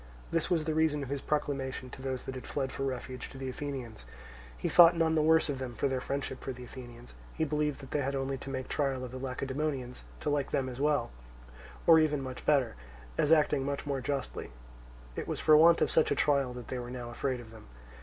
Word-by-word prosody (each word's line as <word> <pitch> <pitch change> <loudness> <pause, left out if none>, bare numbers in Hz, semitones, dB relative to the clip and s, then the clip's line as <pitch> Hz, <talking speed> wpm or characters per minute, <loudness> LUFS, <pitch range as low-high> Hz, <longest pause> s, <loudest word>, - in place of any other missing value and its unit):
This 165 0 0
was 170 -4 +2
the 160 0 -1
reason 155 -2 +2
of 130 - -6
his 140 -1 -2
proclamation 135 -4 -2
to - - -9
those 130 -1 -3
that 130 - -5
had 130 - -8
fled 135 -2 -2
for - - -6
refuge 130 -1 -4
to - - -11
the 135 -1 -4
Athenians: 130 - -6 0.5
he - - -2
thought 170 -1 +8
none 165 -1 +3
the 155 - +3
worse 160 +1 +4
of 140 -3 -3
them 125 -2 -5
for 125 - +1
their 130 -1 -1
friendship 135 -1 -4
for 135 - -3
the 125 -1 -8
Athenians; 120 -1 -10 0.2
he 160 - 0
believed 150 -1 -1
that 135 - -11
they 150 - +1
had 140 +1 -1
only 135 0 -1
to 140 - -7
make 130 -1 -4
trial 135 -3 -1
of 125 - -8
the 130 - -6
Lacedaemonians 135 0 -3 0.2
to 150 - 0
like 145 -2 0
them 130 -1 0
as 125 +1 -6
well, 150 - +2 0.7
or 165 -1 +8
even 150 -2 +2
much 130 -1 -7
better, 140 -5 +3 0.4
as 150 - +2
acting 150 -3 +4
much 140 +1 -3
more 140 -2 -1
justly: 140 +1 -3 0.7
it - - -4
was - - -2
for 155 - +6
want 165 +2 +7
of - - 0
such 160 - +4
a - - +2
trial 140 -3 +2
that 125 -2 -8
they 130 - -3
were 120 0 -6
now 120 -1 -6
afraid 130 +1 -2
of 115 -2 -11
them. 110 - -13
135 Hz, 235 wpm, -31 LUFS, 130-150 Hz, 0.7 s, thought